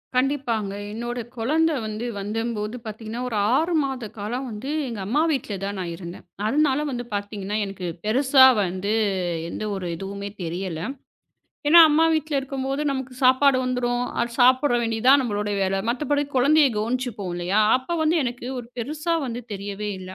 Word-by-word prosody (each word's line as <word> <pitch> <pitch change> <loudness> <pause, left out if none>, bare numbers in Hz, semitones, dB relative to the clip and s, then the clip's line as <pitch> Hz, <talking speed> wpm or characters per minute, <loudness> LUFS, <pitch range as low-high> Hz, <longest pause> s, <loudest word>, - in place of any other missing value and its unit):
கண்டிப்பாங்க. 250 -6 0 0.2
என்னோட 240 +2 -4 0.2
குழந்தை 315 +7 +2
வந்து 215 +2 -4
வந்த 210 +3 -3 0.2
போது, 210 +3 -3
பாத்தீங்கன்னா, 220 +2 -6
ஒரு 225 - -4 0.2
6 330 +5 +1
மாத 265 -4 -3
காலம் 245 +6 -3
வந்து 220 +6 -6 0.2
எங்க 230 -4 -5
அம்மா 290 +9 +2
வீட்டுல 255 -7 -2
தான் 200 0 -4
நான் 175 -2 -3
இருந்தேன். 175 0 -9 0.2
அதனால 280 +2 +2
வந்து 245 -1 -3
பாத்தீங்கன்னா, 205 0 -3
எனக்குப் 185 -3 -6
பெருசா 260 +4 +6 0.2
வந்து 185 +3 -2 0.6
எந்த 215 - -5
ஒரு 185 -2 -4
இதுவுமே 200 +2 -6
தெரியல. 175 0 -4 0.9
ஏன்னா, 340 +3 +9
அம்மா 310 +2 +4
வீட்டுல 310 -2 0
இருக்கும் 270 0 -4
போது 275 +2 -1
நமக்குச் 265 -1 -5
சாப்பாடு 260 +1 +5
வந்துரும். 245 -1 0 0.2
அத 235 - 0
சாப்பிட 255 +1 +5
வேண்டியதா 230 +3 +3
நம்மளோட 210 -3 -2
வேல. 190 0 +1
மத்தபடி 290 +4 0
குழந்தையக் 280 -1 +4
கவனிச்சுப்போம் 225 -4 -2
இல்லயா? 180 +4 +1 0.2
அப்போ 260 +6 -5
வந்து 315 +2 +2
எனக்கு 245 0 -4
ஒரு 240 - -7
பெருசா 305 +7 -2
வந்து 240 0 -5
தெரியவே 205 +1 -4
இல்ல. 185 0 -9
240 Hz, 160 wpm, -24 LUFS, 205-270 Hz, 0.9 s, ஏன்னா